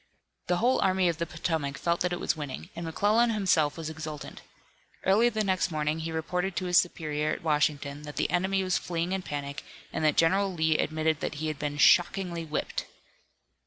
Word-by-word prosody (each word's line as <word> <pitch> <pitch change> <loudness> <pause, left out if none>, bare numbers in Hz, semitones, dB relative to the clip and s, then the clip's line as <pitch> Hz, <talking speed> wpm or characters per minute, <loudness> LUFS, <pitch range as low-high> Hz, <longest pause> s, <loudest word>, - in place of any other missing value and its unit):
The 180 - +2
whole 245 +6 +2
Army 185 -1 +3
of 165 - -3
the 170 - -1
Potomac 160 -4 -2
felt 170 +3 0
that 180 - +1
it 175 - -2
was - - 0
winning 150 +2 -6
and 170 0 -5
McClellan 215 +8 +3
himself 185 -9 +2
was 165 -2 -5
exultant. 155 -1 -7 0.6
Early 215 +6 +5
the 220 -2 -1
next 190 -3 +1
morning 155 0 -1
he 160 0 -4
reported 180 +3 -2
to 185 - -2
his 180 -1 +5
superior 155 -3 -1
at - - -7
Washington 150 -2 0
that 150 -1 -9
the - - 0
enemy 190 +2 +1
was 185 -1 +1
fleeing 170 0 -2
in 190 0 -1
panic 145 -4 -5 0.3
and - - -2
that 150 -1 +3
General 195 +4 +3
Lee 160 -3 +1
admitted 155 0 0
that 155 - -3
he 155 +1 -2
had 150 -3 -5
been 145 -1 -3
"shockingly 175 +2 +3
whipped." 155 -1 -3
165 Hz, 200 wpm, -28 LUFS, 155-185 Hz, 0.6 s, Early